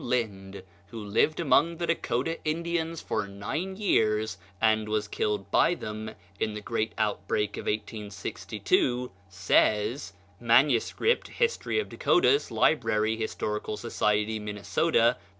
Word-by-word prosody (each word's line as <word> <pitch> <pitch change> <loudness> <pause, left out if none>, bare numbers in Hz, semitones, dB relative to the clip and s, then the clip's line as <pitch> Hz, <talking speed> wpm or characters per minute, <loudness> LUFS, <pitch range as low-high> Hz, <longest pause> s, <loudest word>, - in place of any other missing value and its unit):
Lynd, 100 -6 -3 0.2
who 115 - -10
lived 110 +10 +1
among 165 +1 +3
the 170 - -2
Dakota 165 -1 -1
Indians 165 +1 -2
for 100 - -2
nine 115 - -4
years, 110 - +1 0.2
and 110 -1 +2
was 105 -1 0
killed 105 -2 -2
by 175 - +4
them 110 -4 -6 0.2
in 110 -1 -1
the - - -4
great 110 +1 -2
outbreak 105 0 -1
of - - -7
1862, 110 +4 -2 0.2
says 105 +4 +1 0.3
(MS. 120 +1 +3 0.4
"Hist. 470 -1 0
of 430 - 0
Dakotas," 425 - +3
Library, 110 -7 +2
Historical 105 -1 -3
Society, 105 -1 0
Minnesota, 115 +4 +1
p. - - -27
110 Hz, 120 wpm, -28 LUFS, 105-145 Hz, 0.4 s, by